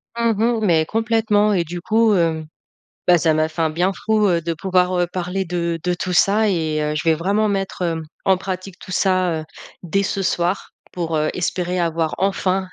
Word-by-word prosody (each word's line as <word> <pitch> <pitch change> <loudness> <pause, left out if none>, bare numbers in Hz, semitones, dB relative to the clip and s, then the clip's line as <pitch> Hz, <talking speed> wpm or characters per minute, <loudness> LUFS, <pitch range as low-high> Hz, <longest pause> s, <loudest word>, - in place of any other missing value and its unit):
Mmh 235 -1 +2 0.3
mh 220 - -1
mais 160 -4 +3
complètement 215 0 +1
et 180 -3 +2
du 175 +2 -6
coup, 220 +2 +3
hem, 160 -3 0 0.6
bah, 175 -1 +6
ça 160 -1 +2
m'a 155 0 +1
fait 165 +1 -3
un 160 - +1
bien 175 +5 0
fou, 215 +1 +1
heu, 170 -2 +2
de 165 0 -3
pouvoir, 180 +2 +1
heu, 175 - +2
parler 185 +1 -2
de 170 -1 -2
de 180 0 0
tout 180 +1 -3
ça 210 +4 +3
et 160 -5 0
heu, 150 0 -1
je 150 - -2
vais 160 - +5
vraiment 200 +7 +1
mettre, 195 -2 -2
hem, 165 -2 -1 0.2
en 190 - +4
pratique 185 0 -6
tout 185 - -10
ça, 185 -4 +1
heu, - - -8 0.4
dès 195 +3 0
ce 195 0 -2
soir 180 +1 -1 0.2
pour, 165 -2 -2
heu, 155 0 +1
espérer 180 0 -1
avoir 165 -2 0
enfin 190 0 0
180 Hz, 210 wpm, -20 LUFS, 165-195 Hz, 0.6 s, bah